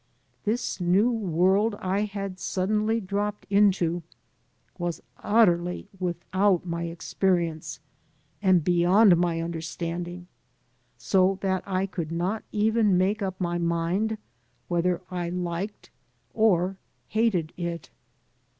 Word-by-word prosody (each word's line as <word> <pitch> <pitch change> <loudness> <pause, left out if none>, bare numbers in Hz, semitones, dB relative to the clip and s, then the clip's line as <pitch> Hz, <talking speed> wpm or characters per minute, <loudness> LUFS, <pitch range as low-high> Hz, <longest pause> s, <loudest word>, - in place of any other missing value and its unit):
This 215 -2 -1
new 190 +7 +3
world 195 +1 +2
I 195 +3 0
had 195 -2 -5
suddenly 215 +5 0
dropped 205 +1 -3
into 185 -4 +3 0.8
was 175 -1 -3 0.2
utterly 180 -4 +2
without 185 +1 +1
my 170 -1 -3
experience 170 -1 -1 0.6
and 185 -4 +4
beyond 180 +4 +5
my 170 -1 0
understanding, 170 +1 -4 0.7
so 190 0 +2
that 190 -2 0
I 190 0 0
could 170 -5 -5
not 180 +6 -1
even 215 -2 +3
make 200 +4 +1
up 190 -1 -3
my 175 -1 -1
mind 170 +6 0 0.5
whether 175 +1 0
I 175 -1 -2
liked 180 +3 -4 0.4
or 195 -4 +2 0.3
hated 200 -8 +1
it. 170 -4 -5
185 Hz, 105 wpm, -26 LUFS, 175-205 Hz, 0.8 s, beyond